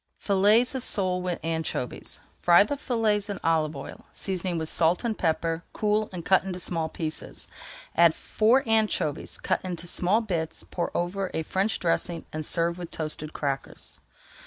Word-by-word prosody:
FILLETS 210 +6 +4
OF 260 -2 -3
SOLE 185 -3 +1
WITH 180 -1 -2
ANCHOVIES 160 -6 -3 0.2
Fry 175 +2 +7
the 250 +8 -2
fillets 220 -6 0
in 200 - -3
olive 160 -2 +2
oil, 135 - -9
seasoning 185 -2 -2
with 160 -1 -2
salt 170 +5 +2
and 230 -2 0
pepper, 165 -1 0
cool, 215 0 +1
and 175 -3 -7
cut 190 -1 +4
into 185 -1 -4
small 165 -2 -1
pieces. 155 -1 -4 0.5
Add 170 -1 +6
four 240 +4 +2
anchovies 215 -9 +1
cut - - 0
into 175 -2 -4
small 180 +4 +2
bits, 165 -7 -3
pour 175 - -3
over 185 +2 -1
a 160 - 0
French 195 +6 0
dressing 170 -1 0
and 155 0 -3
serve 170 +2 0
with 175 -2 -6
toasted 155 -1 -3
crackers. 140 -2 -3
175 Hz, 160 wpm, -27 LUFS, 160-205 Hz, 0.5 s, Fry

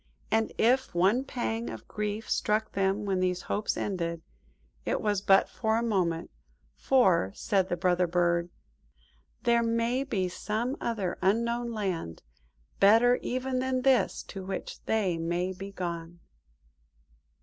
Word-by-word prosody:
And 220 0 +2
if 250 -2 +2
one 195 +9 +3
pang 235 -3 -3
of - - -9
grief 210 +1 -3
struck 215 +1 0
them 195 +2 0
when 190 -2 0
these 180 0 0
hopes 210 - -1
ended, 170 -4 -3 0.6
it - - -1
was 205 -2 0
but 195 -1 +5
for 220 -1 0
a 230 - 0
moment, 180 -7 0 0.4
for, 185 - +3
said 195 -3 0
the 175 - -1
Brother 180 0 +2
Bird– 170 0 +1 0.9
"There 235 -1 +4
may 230 +3 +1
be 200 -9 -1
some 220 +8 -2
other 205 -7 -2
Unknown 235 +5 +1
Land, 185 - -3 0.6
better 230 +5 +6
even 255 0 -2
than 255 0 -1
this, 265 -2 +2
to 195 -2 -8
which 190 0 -6
they 195 -7 0
may 175 +3 -1
be 195 +2 -8
gone." 170 -2 -5
205 Hz, 140 wpm, -29 LUFS, 180-235 Hz, 0.9 s, better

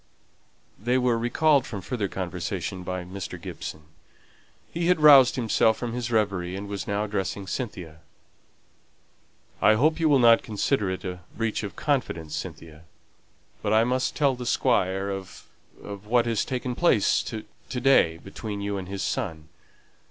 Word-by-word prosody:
They 120 +5 +1
were 125 -2 +2
recalled 140 +4 +2
from 100 -4 -6
further 105 0 -2
conversation 95 0 -4
by 90 0 -4
Mr. 95 +1 -7
Gibson. 75 - -7 0.9
He 170 0 -1
had 180 -2 +3
roused 140 -5 +8
himself 110 -2 +2
from 120 -2 -4
his 120 -1 -3
reverie, 100 -5 0
and 100 +1 -6
was 100 -1 -5
now 100 +1 0
addressing 100 -1 -3
Cynthia. 90 - -5 1.6
"I 110 - +6
hope 155 +8 +2
you 160 -1 +3
will 145 - +5
not 115 -2 +6
consider 105 0 0
it 95 +1 -4
a 90 -1 -5 0.2
breach 115 -1 -1
of 105 -2 -6
confidence, 125 - -2
Cynthia, 80 -1 -8 0.8
but 105 - 0
I 110 +1 +5
must 125 +2 0
tell 140 -3 +3
the 125 -1 -6
Squire 95 -1 +1
of 95 -1 -7 0.4
of 100 0 -8
what 120 +1 +3
has 115 -3 0
taken 125 -1 -3
place 120 - +3
to 110 -2 -6 0.2
day 125 -11 +3
between 100 +3 -7
you 100 0 -2
and 90 - -7
his 100 0 -4
son. 80 -1 -3
105 Hz, 155 wpm, -26 LUFS, 95-125 Hz, 1.6 s, roused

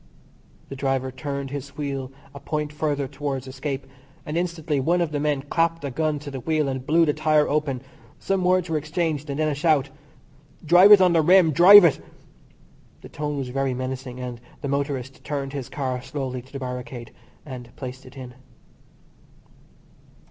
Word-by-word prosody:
The 135 - -6
driver 135 -1 -1
turned 140 +1 -5
his 140 0 -7
wheel 135 -3 -4 0.2
a 140 - -9
point 150 +1 -3
further 145 -2 -1
towards 140 -1 -4
escape, 135 +1 -5 0.4
and 150 - -5
instantly 165 -4 -1
one 170 +7 +1
of 170 -3 0
the 145 - -2
men 145 -2 0
clapped 165 +2 0
a 140 - -3
gun 155 +2 -1
to 145 0 -8
the 135 - -5
wheel 155 +2 0
and 130 -1 -3
blew 165 +4 +3
the 150 - +1
tyre 155 0 +2
open. 140 -4 -1 0.3
Some 195 -1 -1
words 180 0 +2
were 160 -2 0
exchanged, 155 -1 -2
and 140 - -3
then 155 - +2
a 150 - 0
shout: 145 -2 +1 0.7
"Drive 180 +6 +7
it 200 - +8
on 180 -2 +5
the 165 - +4
rim, 180 0 +5
drive 185 +5 +9
it." 160 - +3 1.0
The - - -12
tone 150 -1 -4
was 135 -2 -4
very 135 0 -1
menacing, 130 0 -5
and 125 -2 -6 0.2
the 140 - -3
motorist 140 -2 -3
turned 140 -2 -4
his 140 -3 -5
car 130 -3 -3
slowly 130 -2 -5
to 130 +2 -20
the 140 - -6
barricade 125 -2 -6 0.3
and 125 -4 -8
placed 130 0 -8
it 135 +2 -14
in. 125 -2 -9
140 Hz, 180 wpm, -24 LUFS, 130-155 Hz, 1.0 s, drive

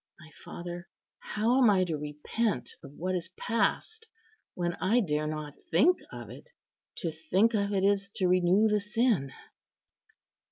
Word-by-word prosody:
My 160 -1 -15
father, 175 +1 -7 0.3
how 235 +5 +1
am 240 - +6
I 190 -3 +4
to 170 -3 -2
repent 150 - -2
of 140 - -10
what 185 +5 -3
is 175 -2 -2
past, 440 - -1 0.5
when 175 -1 -1
I 215 +6 +3
dare 150 -7 0
not 155 -1 -5 0.2
think 325 - +4
of - - -8
it? - - -12 0.5
To 165 - -1
think 180 +9 +1
of 200 -2 0
it 195 -2 +1
is 200 0 +2
to 185 - +1
renew 185 +4 +4
the 210 -1 +2
sin." 210 - +1
185 Hz, 155 wpm, -29 LUFS, 160-220 Hz, 0.5 s, am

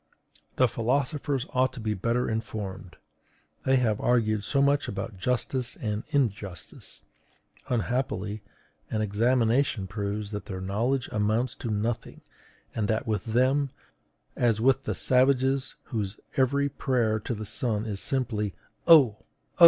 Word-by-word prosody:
The 130 - +5
philosophers 135 +3 0
ought 130 0 +2
to 130 - -8
be 110 -1 -1
better 115 +5 0
informed: 105 -4 -4 0.7
they 130 - +4
have 115 -5 +2
argued 110 -4 +2
so 140 +7 +1
much 140 +1 +3
about 100 0 -5
justice 125 +3 0
and 105 0 -3
injustice! 105 - -3 0.7
Unhappily, 110 -4 -1 0.5
an 110 -1 0
examination 115 +1 +2
proves 100 +1 -3
that 105 -2 -5
their 95 -2 -5
knowledge 115 +8 0
amounts 110 +4 +1
to 115 - -4
nothing, 110 +2 -2 0.5
and 105 -2 -1
that 110 +1 0
with 105 -4 -1
them 130 +5 +2 0.7
as 115 -3 +2
with 135 +3 +3
the - - -1
savages 130 +1 +2 0.2
whose 105 -2 -2 0.2
every 140 +2 +3
prayer 120 -5 0
to 115 - -3
the 110 0 -5
sun 110 0 -1
is 105 -3 -3
simply 110 -8 -1 0.3
_O! 140 -11 +8
O! - - -30
115 Hz, 135 wpm, -27 LUFS, 105-130 Hz, 0.7 s, O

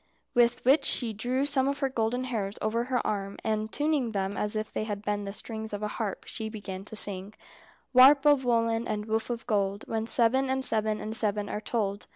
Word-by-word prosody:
With 240 0 +2
which 275 +5 +5
she 230 -3 +3
drew 250 +6 -1
some 275 -2 +2
of 280 0 -1
her 275 -1 0
golden 245 0 -1
hairs 215 -6 -3
over 230 +2 -1
her 250 -1 -1
arm, 200 -1 -3
and 215 0 -1
tuning 290 -6 0
them 195 0 -2
as 210 0 +2
if 215 0 -4
they 215 - -2
had 205 -1 -5
been 205 -1 -2
the 200 - -4
strings 220 +1 -6
of 205 +1 -4
a - - 0
harp, 210 -2 -4
she 220 -1 -5
began 200 -3 -7
to 220 - -9
sing: 200 0 0 0.6
"Warp 270 +3 +7
of 290 -2 +5
woollen 230 -1 +1
and 210 0 -3
woof 220 +1 -2
of 235 -1 -4
gold: 200 -2 -1
When 225 0 -2
seven 260 +1 +2
and 265 0 +1
seven 215 -2 +2
and 215 +2 -5
seven 210 -2 +1
are 210 - -4
told." 205 -3 -2
220 Hz, 215 wpm, -28 LUFS, 210-245 Hz, 0.6 s, Warp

